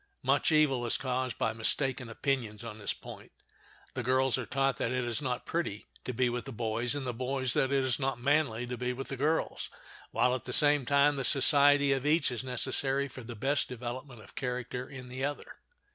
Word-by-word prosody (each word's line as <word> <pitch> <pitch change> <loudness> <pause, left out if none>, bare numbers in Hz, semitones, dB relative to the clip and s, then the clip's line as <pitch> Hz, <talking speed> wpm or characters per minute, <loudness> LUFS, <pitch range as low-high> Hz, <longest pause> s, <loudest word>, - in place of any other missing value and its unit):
Much - - +3
evil 150 -5 +3
is 120 - +2
caused 130 -1 -2
by 110 - 0
mistaken 125 +2 -1
opinions 115 -4 -2
on 110 -2 -7
this 105 - -1
point. - - -9 0.6
The 130 - -2
girls 130 +1 +2
are 130 -3 -4
taught 135 -2 +1
that 115 - -1
it 125 -1 0
is 120 +4 -2
not 125 -2 -2
pretty 165 -12 -2 0.2
to - - -2
be 125 +1 +1
with 120 0 -3
the 135 - -6
boys 115 +2 0
and 145 -2 -3
the 125 - -2
boys 130 +1 0
that 135 - +2
it 135 -1 +2
is 130 +1 +1
not 135 -2 -1
manly 135 -3 +1
to 125 -1 -5
be 125 0 -1
with 135 +2 -6
the 135 - -2
girls, 150 +5 -1 0.4
while 125 - +2
at 130 - -3
the - - -4
same 145 -4 +4
time 140 0 +4
the 135 - -1
society 140 +1 +5
of 135 +1 -1
each 155 -2 +3
is 125 +1 -4
necessary 135 +2 0
for 130 0 -10
the 120 0 -8
best 135 +6 0
development 125 0 -6
of - - -16
character 125 0 -4
in 130 -2 -9
the 130 +2 -5
other. 145 +1 -4
130 Hz, 215 wpm, -30 LUFS, 120-140 Hz, 0.6 s, society